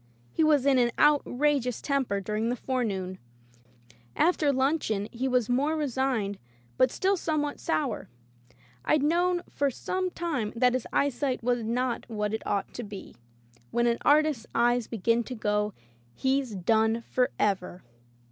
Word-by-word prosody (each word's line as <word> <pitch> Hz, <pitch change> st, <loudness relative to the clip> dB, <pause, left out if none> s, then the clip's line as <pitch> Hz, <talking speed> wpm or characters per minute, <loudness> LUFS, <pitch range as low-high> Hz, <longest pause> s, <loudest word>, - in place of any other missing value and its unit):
He -, -, +2 dB
was 295 Hz, -4 st, +4 dB
in 275 Hz, -2 st, +4 dB
an 240 Hz, -1 st, +3 dB
outrageous 285 Hz, -3 st, +2 dB
temper 270 Hz, -8 st, 0 dB
during 215 Hz, +3 st, -2 dB
the 245 Hz, -, 0 dB
forenoon. 200 Hz, -8 st, -2 dB, 1.0 s
After 315 Hz, -3 st, +3 dB
luncheon 260 Hz, -7 st, 0 dB
he 250 Hz, +3 st, -2 dB
was 250 Hz, -3 st, +1 dB
more 285 Hz, +6 st, +1 dB
re 300 Hz, -2 st, 0 dB
signed 240 Hz, -6 st, -1 dB, 0.4 s
but 255 Hz, -, +4 dB
still 385 Hz, +9 st, +1 dB
somewhat 305 Hz, -4 st, -2 dB
sour. 155 Hz, -, -2 dB, 0.8 s
Fd 305 Hz, -2 st, +3 dB
known 350 Hz, +3 st, +2 dB
for 285 Hz, 0 st, 0 dB
some 370 Hz, +8 st, -2 dB
time 310 Hz, -12 st, -3 dB
that 250 Hz, +1 st, +3 dB
his 255 Hz, -2 st, -2 dB
eyesight 275 Hz, -2 st, 0 dB
was 245 Hz, -1 st, +1 dB
not 240 Hz, +2 st, -2 dB
what 210 Hz, -1 st, -2 dB
it 220 Hz, -, -2 dB
ought 200 Hz, -1 st, -1 dB
to 240 Hz, -, -5 dB
be. 205 Hz, -2 st, -9 dB, 0.5 s
When 240 Hz, 0 st, +1 dB
an 235 Hz, 0 st, +1 dB
artist's 295 Hz, -5 st, +3 dB
eyes 240 Hz, 0 st, +2 dB
begin 230 Hz, +2 st, +1 dB
to 255 Hz, -, -6 dB
go, 210 Hz, -1 st, -1 dB, 0.4 s
he's 265 Hz, -4 st, 0 dB
done 220 Hz, +4 st, +2 dB
forever. 200 Hz, -7 st, -1 dB
250 Hz, 145 wpm, -28 LUFS, 220-285 Hz, 1.0 s, was